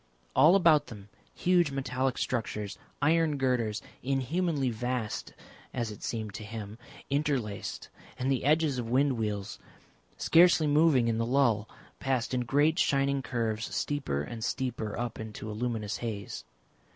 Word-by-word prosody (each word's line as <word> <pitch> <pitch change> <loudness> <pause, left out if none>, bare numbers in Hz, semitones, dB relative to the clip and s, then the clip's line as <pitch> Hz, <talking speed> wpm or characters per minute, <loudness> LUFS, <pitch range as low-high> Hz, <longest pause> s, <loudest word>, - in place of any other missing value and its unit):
All 155 +8 +7
about 160 -6 +5
them, 105 -3 -11 0.3
huge 175 -3 +3
metallic 130 -1 -1
structures, 105 -4 -2 0.3
iron 160 -1 +3
girders, 120 -5 0 0.2
inhumanly 135 +2 0
vast 120 -1 -3 0.4
as 120 -3 -2
it 105 - -10
seemed 110 -3 -4
to 110 - -6
him, 110 0 -7 0.3
interlaced, 140 -8 -1 0.3
and 130 +2 0
the 130 - 0
edges 150 -2 +2
of 115 -2 -4
wind 135 +3 +3
wheels, 105 -3 -3 0.6
scarcely 170 -1 +5
moving 145 -4 +4
in 115 -1 0
the - - +1
lull, 120 -5 +2 0.3
passed 130 -3 -1
in 125 -1 0
great 150 +7 +3
shining 140 0 +2
curves 115 -3 -2
steeper 135 - -1
and 115 +6 -6
steeper 120 -5 -2
up 120 0 -3
into 110 0 -6
a - - -5
luminous 110 -1 -2
haze. 100 - -5
125 Hz, 140 wpm, -29 LUFS, 110-145 Hz, 0.6 s, All